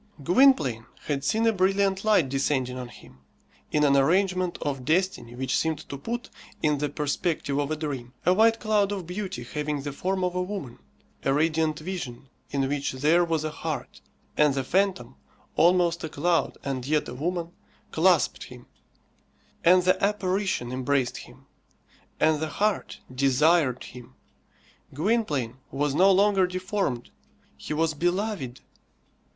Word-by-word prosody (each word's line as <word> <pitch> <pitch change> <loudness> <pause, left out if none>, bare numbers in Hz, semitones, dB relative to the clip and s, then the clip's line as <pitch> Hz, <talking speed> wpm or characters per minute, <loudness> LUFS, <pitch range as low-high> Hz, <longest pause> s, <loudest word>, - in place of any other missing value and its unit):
Gwynplaine 165 - +4 0.2
had 140 -2 -2
seen 220 +10 +1
a 225 - +4
brilliant 195 0 +1
light 210 -9 +4
descending 130 -1 -1
on 125 -1 -6
him, 65 - -16 0.5
in 150 - +2
an 140 -1 +4
arrangement 185 +5 +2
of 135 -3 -3
destiny 160 -6 0
which 130 +1 -1
seemed 160 -1 -1
to - - -5
put, 235 - -5 0.3
in 150 -2 +2
the 145 0 -1
perspective 145 -1 -1
of 145 0 -1
a 155 - -1
dream, 140 -6 -5
a 180 - +5
white 225 +3 +4
cloud 210 -2 +1
of 195 -4 -4
beauty 180 - -5
having 150 +2 -3
the 145 -1 -4
form 185 +5 -2
of 180 -1 0
a 180 - -1
woman, 180 - -6 0.4
a 135 - +1
radiant 155 +1 +1
vision 155 -7 -6 0.2
in 135 -1 0
which 140 0 -2
there 155 +7 +3
was 165 -2 -1
a 155 - -2
heart; 160 -1 -5 0.3
and 150 -2 +3
the 135 - -1
phantom, 180 -7 0 0.4
almost 175 0 +3
a 160 - -3
cloud 165 +3 0
and 130 -2 -3
yet 150 0 +1
a - - -6
woman, 170 +5 -3 0.4
clasped 170 0 +2
him; 125 -2 -13 1.0
and 180 +1 +6
the 185 +2 +2
apparition 195 -9 0
embraced 130 0 0
him; - - -13 0.7
and 155 -1 +3
the 160 0 -2
heart 210 +6 -1
desired 135 +1 +3
him. 125 -1 -12 0.8
Gwynplaine 150 - 0
was 145 +1 -1
no 185 +6 +5
longer 195 -1 +4
deformed. 185 - -3 0.4
He 150 - -5
was 160 0 +1
beloved. 175 - -2
155 Hz, 150 wpm, -26 LUFS, 135-185 Hz, 1.0 s, and